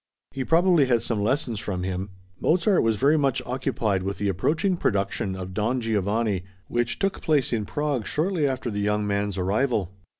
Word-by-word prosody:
He 135 - -3
probably 170 -2 +4
had 120 -3 +2
some 110 -4 -1
lessons 120 0 0
from 95 -4 -3
him. 95 +1 -3 0.3
Mozart 180 +3 +3
was 115 -1 +2
very 145 +6 +4
much 140 -4 +1
occupied 120 -6 -1
with 100 +1 -3
the 100 - 0
approaching 155 - +1
production 100 - -1
of 95 0 -6
Don 115 +6 0
Giovanni, 105 -3 0 0.2
which 120 0 -1
took 195 -1 -1
place 145 -6 +1
in 110 -3 0
Prague 145 -4 -2
shortly 160 -1 0
after 130 -3 -2
the 105 - -3
young 105 0 +1
man's 100 -1 -1
arrival. 100 0 0
115 Hz, 175 wpm, -25 LUFS, 100-140 Hz, 0.3 s, probably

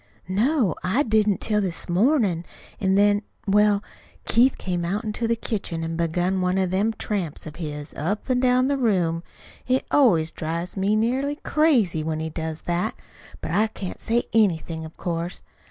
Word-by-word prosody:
"No, 215 - +2
I 225 +11 +2
didn't, 215 -4 +2
till 210 -1 +1
this 185 -4 -2
mornin'; 195 - +2 0.4
an' 190 -1 +2
then 205 +1 +4 0.2
Well, 210 0 +3 0.4
Keith 250 +4 +4
came 180 -2 -2
out 195 +5 -1
into 220 +2 -2
the 230 - +2
kitchen 200 -7 -3
an' 165 0 -3
begun 175 +3 0
one 180 +1 +1
of 190 -2 +1
them 200 +4 +2
tramps 190 -8 -4
of 155 0 -9
his 150 -3 -6
up 195 +8 -2
an' 255 -1 +2
down 255 0 +3
the 280 0 0
room. 180 -8 +1 0.5
It 255 +1 +1
always 175 - +4
drives 170 +2 -4
me 200 +2 +1
nearly 260 +6 0
crazy 260 - +2
when 155 0 -2
he 160 0 -4
does 160 0 -4
that, 175 +5 -1 0.5
but - - -4
I 215 +1 +3
can't 200 -4 -7
say 235 +1 +1
anything, 165 -7 +1
of 160 - -12
course. 170 0 -3
195 Hz, 170 wpm, -24 LUFS, 170-225 Hz, 0.5 s, then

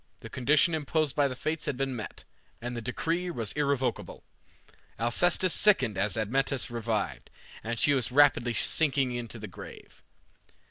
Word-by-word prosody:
The - - -10
condition 145 +6 +2
imposed 155 -1 -1
by 145 -1 +3
the 130 - -5
Fates 155 +4 -3
had 130 - -2
been 135 -1 -2
met, 110 -3 -8 0.4
and 120 +1 -5
the 120 - -4
decree 165 +9 -2
was 115 - -3
irrevocable. 140 -3 -2 0.8
Alcestis 170 +10 +2
sickened 130 - +3
as 105 +4 0
Admetus 130 +4 -1
revived, 115 -3 -3 0.3
and 115 +1 -3
she 145 - +4
was 130 -3 -1
rapidly 125 -4 +4
sinking 130 -6 +1
to - - -9
the - - -7
grave. - - -12
130 Hz, 150 wpm, -28 LUFS, 120-150 Hz, 0.8 s, she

